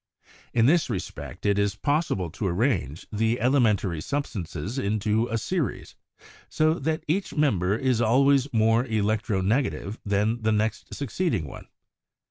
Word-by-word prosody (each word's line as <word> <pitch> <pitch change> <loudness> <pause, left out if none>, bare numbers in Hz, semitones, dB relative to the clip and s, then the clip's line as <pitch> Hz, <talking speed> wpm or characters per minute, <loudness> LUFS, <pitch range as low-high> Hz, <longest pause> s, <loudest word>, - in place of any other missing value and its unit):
In 115 -1 +3
this 160 +3 +3
respect 95 -3 -6
it 100 0 +2
is 100 -1 +1
possi 150 +7 0
ble 90 -4 -4
to 100 +4 -3
arrange 90 - -1
the 115 +3 0
elementary 110 - +2
substances 105 - -4
into 110 +1 0
a 115 - -1
series, 145 - -3 0.5
so 155 0 +2
that 160 +3 -1
each 185 +6 -1
member 105 - +2
is 125 -2 +1
always 135 +4 +3
more 115 +1 +3
electro 110 -3 0
negative 110 0 -1
than 105 +3 0
the 110 0 +1
next 110 +1 -1
succeeding 140 - -1
one. 70 - -10
110 Hz, 140 wpm, -26 LUFS, 100-135 Hz, 0.5 s, In